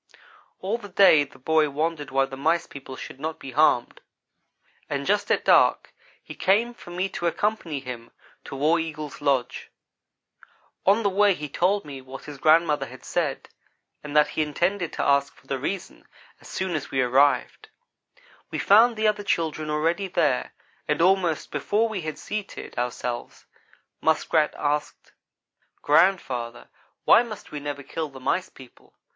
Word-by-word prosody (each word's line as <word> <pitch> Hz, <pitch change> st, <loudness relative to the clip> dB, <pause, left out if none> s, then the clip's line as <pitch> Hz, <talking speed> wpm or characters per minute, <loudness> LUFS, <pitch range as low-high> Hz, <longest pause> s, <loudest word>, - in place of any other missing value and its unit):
All 205 Hz, +5 st, -2 dB
the 205 Hz, -3 st, -10 dB
day 180 Hz, -6 st, +6 dB
the 135 Hz, -, -18 dB
boy 155 Hz, +3 st, +2 dB
wondered 150 Hz, 0 st, -2 dB
why 135 Hz, 0 st, +2 dB
the 135 Hz, -, -9 dB
Mice 165 Hz, +5 st, +1 dB
people 135 Hz, -1 st, -10 dB
should 130 Hz, -, -9 dB
not 160 Hz, +2 st, -4 dB
be 135 Hz, -, -9 dB
harmed; 135 Hz, -3 st, +2 dB, 0.9 s
and 140 Hz, -1 st, -2 dB
just 205 Hz, +3 st, +1 dB
at -, -, +1 dB
dark -, -, +4 dB, 0.3 s
he -, -, -9 dB
came 220 Hz, +6 st, +2 dB
for 205 Hz, -, -14 dB
me 180 Hz, +2 st, -2 dB
to 175 Hz, -, -3 dB
accompany 170 Hz, -5 st, -1 dB
him 120 Hz, -3 st, -8 dB, 0.4 s
to -, -, -7 dB
War 155 Hz, +5 st, +2 dB
Eagle's 155 Hz, -3 st, -6 dB
lodge. 135 Hz, -4 st, -1 dB, 1.2 s
On 205 Hz, +4 st, +4 dB
the 200 Hz, -, +3 dB
way 200 Hz, 0 st, +4 dB
he 150 Hz, -2 st, -6 dB
told 185 Hz, +7 st, 0 dB
me 140 Hz, -2 st, -8 dB
what 130 Hz, +1 st, -10 dB
his 145 Hz, -2 st, -10 dB
grandmother 155 Hz, -3 st, +3 dB
had 130 Hz, +1 st, -13 dB
said, 155 Hz, -6 st, -2 dB, 0.5 s
and 150 Hz, 0 st, -2 dB
that 150 Hz, -, +5 dB
he -, -, -2 dB
intended 170 Hz, +4 st, -1 dB
to -, -, -2 dB
ask 140 Hz, 0 st, +2 dB
for -, -, -23 dB
the 135 Hz, -, -3 dB
reason, 185 Hz, +8 st, -5 dB, 0.3 s
as -, -, -15 dB
soon 190 Hz, -1 st, -3 dB
as 150 Hz, -, -4 dB
we 135 Hz, -, -1 dB
arrived. 130 Hz, +3 st, +2 dB, 0.8 s
We -, -, -4 dB
found 225 Hz, +4 st, +5 dB
the 215 Hz, 0 st, +1 dB
other 210 Hz, -1 st, 0 dB
children 160 Hz, -5 st, -1 dB
already 165 Hz, +6 st, 0 dB
there, 155 Hz, -8 st, 0 dB, 0.4 s
and -, -, 0 dB
almost 180 Hz, -2 st, +2 dB
before 205 Hz, +10 st, +1 dB
we 215 Hz, -4 st, -4 dB
had 155 Hz, -1 st, -5 dB
seated 210 Hz, -1 st, -6 dB
ourselves, 120 Hz, 0 st, -4 dB, 0.6 s
Muskrat 160 Hz, -1 st, +2 dB
asked: 150 Hz, 0 st, -2 dB, 0.7 s
"Grandfather, 145 Hz, -8 st, +1 dB, 0.4 s
why -, -, +7 dB
must 225 Hz, -4 st, -8 dB
we 150 Hz, -, -5 dB
never 145 Hz, -1 st, -5 dB
kill 155 Hz, +3 st, -4 dB
the 135 Hz, -1 st, -12 dB
Mice 180 Hz, +8 st, -1 dB
people? 130 Hz, -2 st, -17 dB
155 Hz, 165 wpm, -25 LUFS, 140-185 Hz, 1.2 s, why